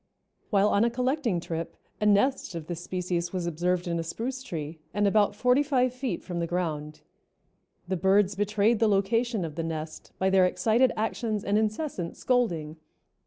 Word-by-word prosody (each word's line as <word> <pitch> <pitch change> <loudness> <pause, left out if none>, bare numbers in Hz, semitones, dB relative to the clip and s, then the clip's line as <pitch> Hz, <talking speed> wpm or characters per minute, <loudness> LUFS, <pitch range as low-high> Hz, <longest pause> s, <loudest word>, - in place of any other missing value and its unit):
While 205 -1 +3
on 205 - +3
a 235 - +3
collecting 250 - 0
trip 165 0 -5 0.2
a 210 - +3
nest 205 -1 +2
of 165 -2 -5
this 175 +1 -6
species 175 -1 -2
was 185 -2 -2
observed 175 +2 -1
in 170 -1 -1
a - - -2
spruce 250 +10 -4
tree 160 - -6 0.2
and 205 0 +2
about 205 0 +3
forty 250 +5 +3
five 255 -4 +1
feet 255 -8 -3
from 175 -2 -4
the 170 - -1
ground. 155 -4 -3 0.9
The 190 0 -1
birds 195 +2 +3
betrayed 205 +2 +1
the 225 - +4
location 210 +1 +1
of 155 - -6
the 165 - -3
nest 160 -1 -6
by 190 0 +1
their 190 -1 +5
excited 230 +6 +2
actions 220 -1 -1
and 200 - 0
incessant 215 - -1
scolding. 170 -12 0
195 Hz, 175 wpm, -27 LUFS, 170-230 Hz, 0.9 s, their